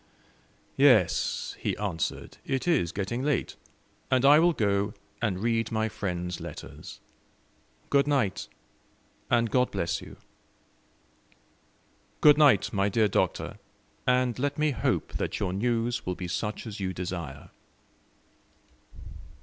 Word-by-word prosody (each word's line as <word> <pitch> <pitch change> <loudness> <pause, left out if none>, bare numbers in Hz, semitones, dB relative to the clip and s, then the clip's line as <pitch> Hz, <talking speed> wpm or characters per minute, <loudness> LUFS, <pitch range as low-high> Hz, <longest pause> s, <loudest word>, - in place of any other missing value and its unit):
"Yes," 110 - +3
he - - -2
answered, 95 -7 -3
"it 135 +5 -2
is 130 - +2
getting 105 +5 -3
late; 145 -1 -1 0.5
and 130 0 +3
I 145 +2 +8
will 170 +1 +4
go 100 -3 0 0.3
and 105 -6 0
read 115 +2 0
my 110 0 0
friends' 90 -4 -4
letters. - - -9 0.9
Good 140 0 +4
night, 130 -10 0 0.8
and 115 -2 +2
God 125 -1 +3
bless 85 -4 -2
you." - - -12 2.0
"Good 150 0 +6
night, 140 -10 +5
my 100 0 +1
dear 110 +1 +3
Doctor; - - -1 0.5
and 125 -1 +2
let 145 +1 -1
me 150 0 +2
hope 130 - -1
that - - -3
your 90 - -1
news 120 +3 0
will 90 - -3
be 90 - -5
such 105 +5 -3
as 110 -2 -7
you 95 -1 -2
desire." 85 -6 -6
110 Hz, 125 wpm, -27 LUFS, 95-130 Hz, 2.0 s, I